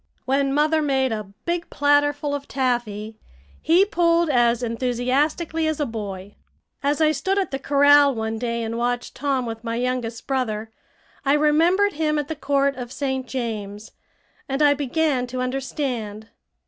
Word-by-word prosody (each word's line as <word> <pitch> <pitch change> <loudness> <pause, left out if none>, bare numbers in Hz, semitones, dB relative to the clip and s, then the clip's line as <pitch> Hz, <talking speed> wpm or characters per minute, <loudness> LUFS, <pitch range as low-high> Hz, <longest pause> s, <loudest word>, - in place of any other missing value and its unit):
When 275 +1 +1
mother 305 +2 +2
made 265 -3 +1
a 215 -3 -4
big 340 0 -2
platter 290 0 +3
full 290 0 -4
of 285 0 -4
taffy, 225 -5 -2 0.4
he 350 +5 +4
pulled 340 -4 +2
as 240 -1 +2
enthusiastically 260 +7 0
as 315 -1 -1
a 295 - +1
boy. 205 -4 -6 0.5
As 290 +2 0
I 310 -1 +5
stood 345 +7 -1
at 390 -4 0
the 270 - -3
corral, 285 0 +5
one 220 0 -3
day, 235 -1 -2
and 230 +1 -3
watched 245 0 -2
Tom 270 -2 -1
with 225 0 -6
my 230 -1 -3
youngest 240 -2 -2
brother, 225 -5 -2 0.5
I 275 0 +3
remembered 330 +7 +3
him 305 0 0
at 295 0 -2
the 320 - -3
court 280 -1 +1
of 245 -1 -6
St. 265 -2 -3
James, 215 -4 -5 0.6
and 270 +3 +1
I 290 -1 +6
began 285 -2 0
to 255 +1 -5
understand. 250 -5 -3
270 Hz, 160 wpm, -23 LUFS, 235-295 Hz, 0.6 s, I